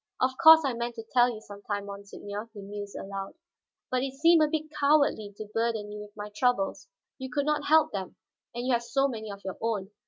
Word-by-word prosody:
"Of 255 - +2
course 320 -1 +10
I 265 - 0
meant 235 0 -4
to 225 - -7
tell 245 -1 +5
you 220 -3 -6
some 205 -2 -11
time, 205 -1 -3
monseigneur," 200 +2 -7
he 205 - -8
mused 205 0 -7
aloud. 195 +3 -6 0.6
"But 255 0 +1
it 270 0 -3
seemed 330 +3 +5
a 305 - +5
bit 310 0 -3
cowardly 280 -8 +3
to 215 - -6
burden 225 -2 -1
you 210 0 -7
with 210 0 -13
my 210 0 -6
troubles; 245 -4 0 0.3
you 260 0 -5
could 280 +3 -1
not 300 0 0
help 315 +1 +5
them, 190 -2 -5 0.4
and 240 +1 -3
you 255 - +2
have 235 - +2
so 270 +3 +1
many 220 -5 -6
of 200 0 -11
your 190 - -5
own. 215 -3 -2
230 Hz, 225 wpm, -28 LUFS, 205-270 Hz, 0.6 s, course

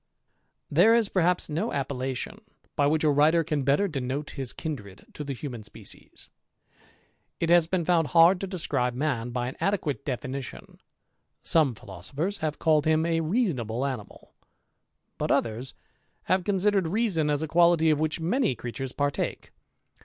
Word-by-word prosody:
There 225 +1 +6
is 225 -4 +2
perhaps 180 -1 +2
no 165 +9 -2
appellation 135 -2 -3 0.4
by 145 - +3
which 155 +2 +1
a 150 - +4
writer 155 +4 +4
can 150 -3 -1
*^tter 140 +10 +2
denote 140 -2 -4
his 135 -4 -5
kindred 105 - -7
to 150 - -6
the 140 -2 -4
human 125 -4 -6
species. 105 - -11 1.1
It 165 - 0
has 170 -2 +5
"^en 175 -1 -1
found 165 -3 +2
hard 170 +3 +5
to 195 - -3
describe 125 -9 -1
man 125 -4 -1
by 120 0 -2
an 130 - -7
adequate 170 -9 -1
definition. 135 0 -6 0.7
^oixie 145 -9 +3
philosophers 135 - -5
have 155 -1 -2
called 155 -2 +2
him 160 0 +3
a 165 -1 +1
reasonable 150 - -1
animal; 125 -7 -7 0.9
^^t - - -1
others 115 +3 -1 0.5
have 185 0 +1
considered 195 -1 +1
reason 180 -5 +1
as 145 +1 0
a - - -2
quality 170 0 +4
of 150 - +1
which 155 +1 -1
'^any 180 - 0
creatures 125 +2 -5
partake. 145 0 -2
150 Hz, 155 wpm, -27 LUFS, 130-170 Hz, 1.1 s, There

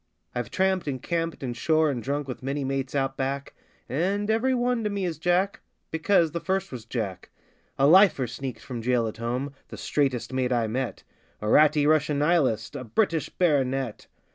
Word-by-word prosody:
I've 120 -1 -3
tramped, 190 -3 +1
and 135 -2 -2
camped, 165 +1 -2
and 120 -2 -3
'shore' 155 +5 +2
and 125 -3 -3
drunk 140 +4 -2
with 130 - -6
many 140 +2 -2
mates 135 0 -2
Out 135 -1 0
Back 135 +1 -3 0.3
And 195 - 0
every 255 +4 +2
one 245 -1 0
to 210 - 0
me 200 -2 -2
is 165 -4 -3
Jack 180 +4 +1 0.3
because 165 0 +2
the 170 - -3
first 190 +2 -1
was 120 -4 -7
Jack 110 -7 -4 0.5
A 135 - +4
'lifer' 175 -4 +6
sneaked 125 +2 -6
from 120 -3 -6
jail 120 0 +2
at 110 - -6
home 125 +5 -3
the - - -9
'straightest' 130 -4 -1
mate 130 -1 0
I 120 -2 +2
met 125 +3 -3 0.4
A 105 - -4
'ratty' 150 +4 +5
Russian 150 -1 +3
Nihilist 140 - +1
a - - -4
British 160 - 0
Baronet! 135 - 0
140 Hz, 185 wpm, -26 LUFS, 125-170 Hz, 0.5 s, lifer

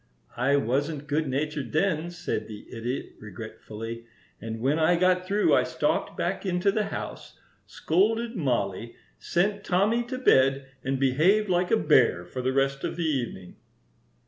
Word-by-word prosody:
"I 130 +4 +2
wasn't 140 +3 -1
good 150 +1 0
natured 145 +1 -3
then," 160 0 +1
said 175 0 -4
the 105 -1 -10
Idiot, 120 +4 -4
regretfully; 110 +2 -8 0.3
"and 110 +1 -5
when 140 +7 +1
I 160 +2 +4
got 180 +1 +2
through 205 +2 +3
I - - +5
stalked - - -1
back - - -2
into 185 +1 +1
the 210 +1 0
house, - - -7 0.3
scolded 225 +7 0
Mollie, 115 - -1 0.2
sent 200 +3 0
Tommy 200 +6 +2
to 255 +2 -5
bed, 135 - +3 0.2
and 135 0 -1
behaved 165 +11 +3
like 180 0 +1
a - - +4
bear 90 0 +3
for 130 +9 -5
the 130 +1 0
rest 135 +1 0
of - - -2
the 170 -1 -2
evening." 120 - -3
145 Hz, 155 wpm, -26 LUFS, 125-180 Hz, 0.3 s, I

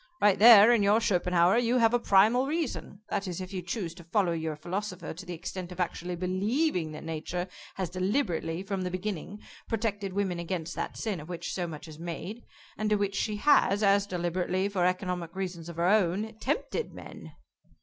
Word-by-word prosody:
Right 205 -2 +4
there, 225 0 +9
in 235 -3 +4
your 205 +2 +4
Schopenhauer, 180 -2 +3
you 245 +1 +2
have 230 -1 +4
a 245 - +4
primal 225 +5 +4
reason, 295 -9 -3
that 200 0 -2
is, 180 -1 -4
if 185 +1 -7
you 185 - -3
chose 175 -1 -4
to 170 0 -13
follow 180 +1 +1
your 160 -2 -2
philosopher 185 +4 -5
to 180 +4 -10
the 175 - -4
extent 180 +2 -6
of 180 - -9
actually 175 0 -2
believing 185 - 0
that 155 - -8
Nature 165 +3 -4 0.3
has 185 -3 -3
deliberately, 185 - -1
from 195 -1 -3
the 180 - -2
beginning, 190 +2 -5 0.3
protected 205 -4 -2
women 190 -3 -1
against 170 -1 -4
that - - -4
sin 210 -6 -2
of 150 +3 -10
which 175 -2 -4
so 180 -2 -2
much 155 -1 -8
is 155 -1 -11
made, 180 +7 -6 0.4
and 215 0 0
to 210 - +4
which 200 -1 -1
she 210 +1 -1
has, 205 -4 +4
as 200 0 +4
deliberately, 180 +1 -1
for 185 -3 +1
economic 180 -2 -2
reasons 180 -3 -4
of 170 - -8
her 170 +1 0
own, 205 +2 +2
tempted 295 - -2
men." - - -10
185 Hz, 195 wpm, -29 LUFS, 175-210 Hz, 0.4 s, there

